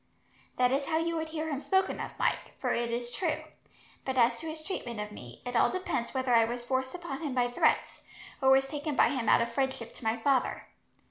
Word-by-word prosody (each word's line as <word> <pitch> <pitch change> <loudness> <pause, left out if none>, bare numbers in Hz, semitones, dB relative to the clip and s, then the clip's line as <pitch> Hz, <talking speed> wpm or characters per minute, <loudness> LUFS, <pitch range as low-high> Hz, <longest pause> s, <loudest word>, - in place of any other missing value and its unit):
"That 250 0 +4
is 275 +1 +1
how 320 - +1
you 335 +1 0
would 320 0 -3
hear 315 0 -3
him 280 -2 -2
spoken 380 +3 +1
of, - - -6
Mike, - - 0
for - - 0
it 235 0 0
is 240 +1 -2
true; 340 +2 -1 0.6
but 265 -1 -2
as 235 -1 +4
to 325 - -6
his 315 0 -5
treatment 240 - -4
of 210 0 -4
me, 125 - -11
it 245 0 -4
all - - +5
depends 365 -10 -2
whether 260 -2 0
I 230 -1 +7
was 240 +1 -3
forced 260 +3 -1
upon 340 -6 -5
him 290 -5 -3
by 245 -1 +2
threats, 245 - +1 0.4
or 265 - +5
was 270 0 +5
taken 295 +1 -3
by - - +5
him 255 -4 -1
out - - +6
of 235 0 -5
friendship 265 -3 -1
to - - -12
my 225 +1 +1
father. 260 +2 +1
260 Hz, 230 wpm, -30 LUFS, 240-310 Hz, 0.6 s, I